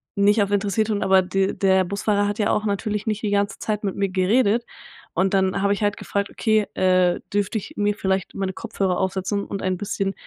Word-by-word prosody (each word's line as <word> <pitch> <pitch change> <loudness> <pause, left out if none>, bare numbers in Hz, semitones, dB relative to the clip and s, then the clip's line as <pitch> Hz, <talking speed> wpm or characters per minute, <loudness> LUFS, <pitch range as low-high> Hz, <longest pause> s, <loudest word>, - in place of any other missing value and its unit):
nicht 205 +1 +4
auf 200 - -4
interessiert 205 +2 +1
tun, 210 -2 0
aber 190 0 +5
de 195 +1 0
der 190 -1 +3
Busfahrer 205 +2 0
hat 205 +1 -3
ja 210 0 +2
auch 210 - 0
natürlich 210 +1 -2
nicht 215 -1 -1
die 205 - 0
ganze 200 0 0
Zeit 210 -1 -2
mit 195 - -2
mir 200 -1 0
geredet. 210 +5 +2 0.5
Und 190 +3 +1
dann 190 0 +1
habe 200 0 +2
ich 205 - -3
halt 205 0 +1
gefragt: 200 0 -2
„Okay, 215 -2 +1
äh, 185 -1 +3
dürfte 205 +2 0
ich 200 - -7
mir 205 0 +1
vielleicht 190 -2 -2
meine 190 -1 -2
Kopfhörer 195 -4 -2
aufsetzen 190 +2 -1
und 195 - -5
ein 185 -1 0
bisschen 195 0 -2
200 Hz, 215 wpm, -23 LUFS, 190-205 Hz, 0.5 s, aber